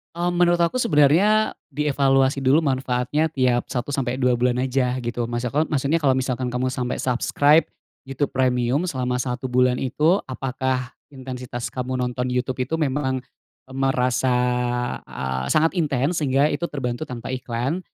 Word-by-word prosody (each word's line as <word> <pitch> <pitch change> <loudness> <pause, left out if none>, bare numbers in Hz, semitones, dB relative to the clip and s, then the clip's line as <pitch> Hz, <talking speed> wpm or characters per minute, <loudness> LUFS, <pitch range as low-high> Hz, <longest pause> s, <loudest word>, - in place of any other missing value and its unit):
Mmm, 175 +1 -1
menurut 175 0 +3
aku 170 +6 +1
sebenarnya 210 - +3 0.2
di 150 +2 -2
evaluasi 135 -1 +2
dulu 135 +5 +5
manfaatnya 135 +2 0
tiap 125 -4 +1
1 130 +2 -2
sampai 130 -1 -2
2 125 -1 +3
bulan 125 +1 +1
aja, 130 -1 0
gitu. 120 0 -3
Maksad 120 +7 -1
maksudnya 145 +3 0
kalau 135 - +5
misalkan 130 -1 -1
kamu 125 +1 -1
sampai 125 -1 -3
subscribe 145 +5 +3 0.4
YouTube 135 +1 -2
Premium 130 +3 +1
selama 125 -7 -2
1 125 +1 -3
bulan 125 0 +2
itu, 155 +8 +2
apakah 130 -1 -2 0.2
intensitas 125 -2 -6
kamu 130 0 -3
nonton 125 0 -2
youtube 125 +1 -2
itu 160 - -1
memang 130 -3 -1 0.5
merasa, 130 -1 +1 0.8
eee, 65 0 -3
sangat 160 - +3
intens 150 +2 0
sehingga 140 +1 +2
itu 160 +4 -2
terbantu 130 0 -4
tanpa 125 0 -6
iklan? 130 +5 -2
130 Hz, 145 wpm, -23 LUFS, 125-145 Hz, 0.8 s, dulu